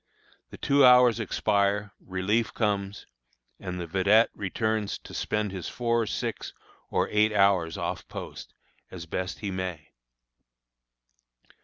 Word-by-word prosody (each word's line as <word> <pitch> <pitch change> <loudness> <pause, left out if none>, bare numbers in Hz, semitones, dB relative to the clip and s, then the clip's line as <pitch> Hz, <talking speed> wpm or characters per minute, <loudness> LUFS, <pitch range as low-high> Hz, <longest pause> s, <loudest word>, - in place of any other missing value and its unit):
The - - -11
two 140 0 +3
hours 125 -2 +7
expire, 105 -1 0
relief 100 +4 -1
comes, 100 -2 -1 0.5
and 90 -1 -5
the 85 - -4
vedette 100 +6 +3
returns 110 +1 -2
to - - -13
spend 105 -2 -2
his 95 -3 -5
four, 115 -2 0
six, - - -4 0.4
or - - +1
eight 105 +1 +3
hours 100 -5 +2
off - - -4
post, - - -9 0.3
as 85 -2 -8
best 90 +4 -4
he 100 -2 -3
may. 90 -4 -5
100 Hz, 125 wpm, -27 LUFS, 95-110 Hz, 0.5 s, hours